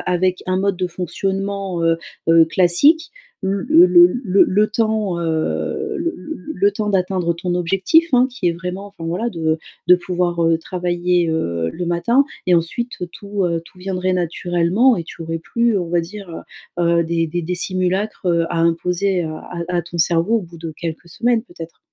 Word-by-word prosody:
avec 185 +1 0
un 185 0 0
mode 195 0 0
de 180 0 -1
fonctionnement, 190 +1 -3
heu 165 0 +3 0.3
heu, 165 0 +7
classique. 185 - +3 0.3
L 190 - 0 0.2
le 175 +2 +7
le 180 +5 +5
le 195 0 +4
le 210 +3 +3
temps, 215 -4 0
heu, 170 - -2
le 335 -1 -2
le - - -12
le 315 - -8
le 400 +5 +2
temps 215 - -3
d'atteindre 185 -3 0
ton 175 +1 -3
objectif, 195 - +2
hein, 250 0 +5
qui 230 -9 -2
est - - +1
vraiment, 180 +3 -6
enfin, 185 -5 -11
voilà, 180 +8 -1
de 160 -5 -1 0.3
de 180 - +8
pouvoir, 175 -1 -1
heu, 165 0 +3
travailler, 175 0 0
heu, 85 - -1
le 175 0 -4
matin 235 +11 +2 0.2
et 175 - +6
ensuite 235 +9 -2 0.2
tout, 200 -1 -3
heu, 170 -1 -1
tout 180 - -18
viendrait 185 0 -2
naturellement 175 +7 +2
et 170 - -4
tu 170 - -9
aurais 165 0 -3
plus, 235 +5 0
on 175 -2 -3
va 170 0 +2
dire, 195 +3 -9 0.5
heu, 170 -1 +3
des 165 0 -1
des 175 +2 -3
des 180 +3 -2
simulacres, 185 +3 -1
heu, 170 -1 +2
à 170 - -1
imposer 175 +3 +1
à 155 -1 -5 0.3
à 180 - -1
à 175 - 0
ton 170 +1 -8
cerveau 170 +7 +2
au 210 - -6
bout 170 -1 -12
de 160 -1 -6
quelques 165 0 -6
semaines 235 +6 0
peut-être. 170 -6 -11
180 Hz, 190 wpm, -19 LUFS, 170-200 Hz, 0.5 s, de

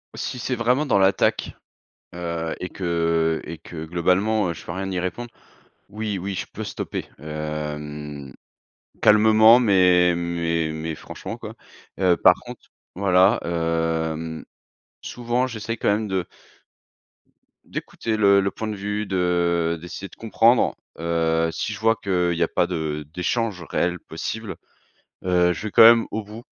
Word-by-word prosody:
Si 125 - -4
c'est 125 +1 -2
vraiment 125 +6 +2
dans 110 -7 +2
l'attaque, 95 0 +2 0.6
heu 85 -2 -3
et 90 - -4
que 85 -2 0
et 80 +1 -7
que 80 -1 -9
globalement, 90 +5 +1
heu, - - -1
je - - -11
peux - - -5
rien 95 +2 -4
y 95 - -3
répondre, 115 +7 -4 0.6
oui, 105 -1 -3
oui 95 +2 -4
je 90 - -4
peux - - -6
stopper, - - -5
hem. 75 -2 -6 0.7
Calmement 110 +2 +7
mais 90 -6 +4
mais 85 -2 -1
mais 80 +1 -4
franchement - - -8
quoi. - - -8 0.4
Heu, 90 -2 +3
par - - +7
contre - - -10 0.3
voilà, 95 +2 +4
hem, 80 -1 -2 0.6
souvent 120 +1 -1
j'essaie 115 -1 -4
quand 115 - 0
même 105 +1 0
de 95 -2 -1 1.4
d'écouter 110 -1 -4
le 100 -1 +5
le 95 - 0
point 110 - -5
de 105 - -3
vue, 105 +1 -3
de 85 -3 +1
d'essayer 90 +3 -7
de - - -16
comprendre, 115 +2 +3 0.2
heu, 80 0 +1
si 105 - -3
je - - -8
vois 115 +1 +3
qu'il 90 -5 0
y 85 - -3
a - - +1
pas - - +1
de 80 -4 -3
d'échanges 95 +1 -1
réels 90 -1 0
possibles, 110 +6 -6 0.7
heu, 90 -1 +3
je - - -7
vais - - -6
quand - - +7
même 115 0 +8
au 110 - -2
bout. 110 +3 -11
90 Hz, 155 wpm, -23 LUFS, 85-105 Hz, 1.4 s, même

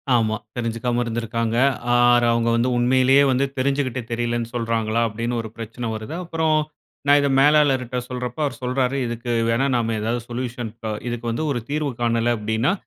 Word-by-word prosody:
ஆமா. 110 -2 +2 0.2
தெரிஞ்சிக்காம 120 +1 -1
இருந்திருக்காங்க. 115 0 -2 0.4
ஆர் 120 0 +5
அவுங்க 115 0 +1
வந்து 120 +2 +2
உண்மையிலே 130 +2 +4
வந்து 130 +2 +2
தெரிஞ்சுக்கிட்டு 130 -1 0
தெரியலேன்னு 120 0 -1
சொல்றாங்களா? 115 -1 0
அப்டீன்னு 115 +2 -3
ஒரு 110 - -8
பிரச்சனை 115 +1 -6
வருது. 110 +7 -6
அப்பறம் 160 -2 +1 0.5
நான் 145 +1 +6
இத 140 - +2
மேலாளர்ட்ட 135 -4 +3
சொல்றப்போ 125 +2 -5
அவரு 140 - -3
சொல்றாரு, 125 +1 0
"இதுக்கு 120 +1 -4 0.2
வேணா 120 +4 +2
நம்ம 115 -1 0
ஏதாவது 115 +2 -1
சொல்யூஷன் 120 -2 -4
ப 110 - -2 0.2
இதுக்கு 120 -1 -3
வந்து 135 +7 -2
ஒரு 120 - -1
தீர்வு 150 -1 -1
காணல"" 115 0 +2
அப்டீன்னா 110 - +1
120 Hz, 160 wpm, -22 LUFS, 115-130 Hz, 0.5 s, நான்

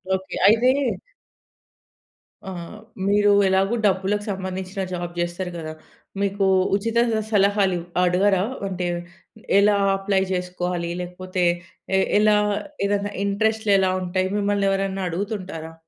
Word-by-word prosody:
Okay. 190 0 -6
అయితే 225 +4 +5 1.8
ఆ! - - -4 0.6
మీరు 205 0 +4 0.2
ఎలాగో 190 +4 +2
డబ్బులకు 195 +1 +1
సంబంధించిన 190 0 -4
జాబ్ 175 -1 -4
చేస్తరు 175 +1 -3
గదా! 160 -2 -6 0.5
మీకు 200 0 0 0.3
ఉచిత 230 +3 -1 0.2
స - - +1
సలహాలు 200 -2 +3 0.3
అడగరా? 185 +1 +3 0.2
అంటే 180 -2 -3 0.7
ఎలా 205 +1 +4 0.2
అప్లై 195 0 +1
జెసుకోవాలి? 180 -1 -2
లేకపోతే 185 +1 -4 0.5
ఏ - - +4 0.2
ఎలా 210 0 +4 0.5
ఏదైనా 205 0 -1
ఇంట్రెస్ట్‌లు 220 +1 +1
ఎలా 190 -1 +2
ఉంటాయి? 185 +1 -1
మిమ్మల్ని 200 -1 +1
ఎవరైనా 195 0 -1
అడుగుతుంటారా? 180 -3 -5
195 Hz, 110 wpm, -23 LUFS, 180-205 Hz, 1.8 s, అయితే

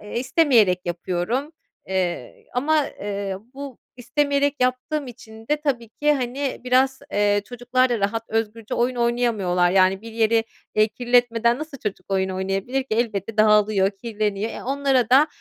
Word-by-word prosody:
istemeyerek 235 - +3
yapıyorum, 180 - -2 0.4
eee, 185 -2 -3
ama, 295 +3 +2
eee, 200 -1 -4 0.2
bu 275 -2 -8 0.2
istemeyerek 285 +2 +1
yaptığım 255 +3 0
için 225 -2 -12
de 300 - +2
tabii 245 -6 -2
ki, 295 +6 +1
hani, 265 +1 -3
biraz, 260 +1 +2
eee, 205 0 +2
çocuklar 250 +2 0
da 235 -3 0
rahat, 215 +3 -1
özgürce 225 0 -2
oyun 245 +1 +1
oynayamıyorlar, 225 -7 +1
yani, 190 0 +3
bir 230 0 -9
yeri, 225 0 +2 0.3
eee, 215 +1 +4
kirletmeden 240 +1 +2
nasıl 310 -2 -7
çocuk 205 -6 -5
oyun 190 0 +1
oynayabilir 195 +8 -2
ki? 260 - -31
Elbette 220 -2 -2
dağılıyor, 210 -2 +4
kirleniyor, 210 0 -3
eee, - - -7
onlara 270 -2 +1
da, 275 +4 +6
230 Hz, 145 wpm, -23 LUFS, 205-255 Hz, 0.4 s, da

